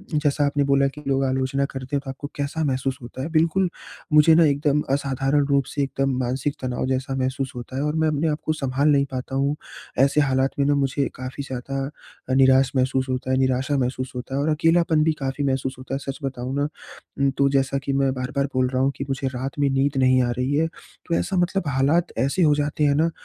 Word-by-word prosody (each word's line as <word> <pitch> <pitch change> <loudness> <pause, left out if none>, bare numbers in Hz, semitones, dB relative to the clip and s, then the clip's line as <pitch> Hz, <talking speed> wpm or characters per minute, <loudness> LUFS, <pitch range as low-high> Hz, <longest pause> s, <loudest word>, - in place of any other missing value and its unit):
जैसा 150 -1 +2
आपने 145 0 +1
बोला 140 0 +3
कि 150 +2 -8
लोग 135 0 +1
आलोचना 130 +1 0
करते 135 +1 -5
हैं 140 - 0
तो - - -6
आपको 135 +2 -6
कैसा 145 +3 -2
महसूस 135 -2 -1
होता 120 +2 -8
है। 160 - -4
बिल्कुल 165 +3 +2 0.4
मुझे 150 +2 +7
ना 165 0 +6
एकदम 145 0 +2
असाधारण 135 +1 +1
रूप 140 -2 +2
से 140 +2 -3
एकदम 135 -1 -1
मानसिक 130 +3 -1
तनाव 125 -1 -2
जैसा 130 +1 -1
महसूस 130 0 -2
होता 125 +1 -7
है 135 - 0
और 150 +1 -1
मैं 160 0 +2
अपने 155 +1 0
आप 150 - -1
को 155 - +1
सँभाल 140 0 0
नहीं 140 -1 +4
पाता 130 +1 -4
हूँ 140 +2 +1 0.4
ऐसे 140 +2 +4
हालात 135 -1 +1
में 140 - +3
ना 145 0 +3
मुझे 140 0 0
काफ़ी 130 +2 -6
ज़्यादा 135 +1 -6
निराश 130 0 +5
महसूस 130 0 +1
होता 130 0 -2
है, 130 - +2
निराशा 130 +2 +1
महसूस 130 0 -2
होता 125 +2 -5
है 140 - 0
और 155 - 0
अकेलापन 165 0 +3
भी 160 0 +2
काफ़ी 135 +1 -2
महसूस 130 -1 -1
होता 135 +1 -5
है। 135 - -2
सच 135 - -12
बताऊँ 130 0 -3
ना 145 +1 +1 0.5
उम, 140 0 +3
तो 140 +1 +2
जैसा 135 0 +1
कि 140 -1 -1
मैं 135 -1 +2
बार-बार 130 +2 -2
बोल 130 0 +3
रहा 130 0 0
हूँ 135 - +2
कि 140 - -3
मुझे 135 0 -2
रात 130 +3 -4
में 140 -1 +3
नींद 135 +1 +1
नहीं 130 -1 +4
आ 120 - 0
रही 130 +3 0
है 160 +2 +2 0.4
तो 170 - +1
ऐसा 190 - -1
मतलब 175 -1 0
हालात 145 +6 +2
ऐसे 140 +9 +1
हो 150 - +5
जाते 150 +1 -1
हैं 145 -1 +3
ना 160 +3 +3
135 Hz, 230 wpm, -23 LUFS, 130-145 Hz, 0.5 s, मुझे